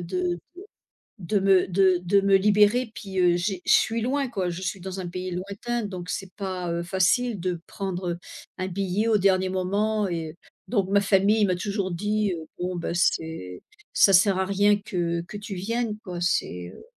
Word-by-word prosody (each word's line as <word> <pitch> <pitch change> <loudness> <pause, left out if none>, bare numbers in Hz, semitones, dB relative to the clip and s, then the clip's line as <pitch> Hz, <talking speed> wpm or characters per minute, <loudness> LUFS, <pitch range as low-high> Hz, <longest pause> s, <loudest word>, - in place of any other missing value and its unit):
de 175 0 -2 0.8
de 195 +3 0
me 190 -2 +4
de 185 0 +3
de 200 +3 +3
me 195 0 +4
libérer. 210 +4 +3
Puis, 195 -2 -5
heu, 175 -1 +4
j'ai 180 +1 -2
je - - +4
suis 225 +1 +3
loin 270 +3 0
quoi, 195 -6 -2
je 175 +1 -5
suis 190 +1 -3
dans 190 +1 -6
un 180 - -4
pays 180 +1 -5
lointain. 200 +6 -3
Donc 180 -3 -6
c'est 190 0 -4
pas, 185 -3 -4
heu, 170 0 -1
facile 190 +6 +1
de 175 -1 -3
prendre, 185 -2 -4
heu, 170 - -7 0.4
un 185 - -2
billet 195 +3 -1
au 220 -2 +4
dernier 190 -1 +3
moment 200 +3 0
et 165 -3 -3
heu, - - -19 0.3
donc 200 -5 0
ma 200 +1 +4
famille 200 +2 +3
m'a 185 -2 +1
toujours 200 +1 -2
dit: 210 +3 0
«Heu, 160 -1 -8
bon, 180 +1 -2
ben, 170 - -3
c'est 160 - -1 0.3
ça 195 - +6
sert 195 +1 +5
à - - +2
rien 205 +2 +3
que 170 -4 -2
que 190 +5 -8
tu 205 0 -7
viennes 220 +3 -2
quoi, 180 -5 -7
c'est, 90 - -1
heu» - - -14
190 Hz, 200 wpm, -25 LUFS, 180-205 Hz, 0.8 s, ça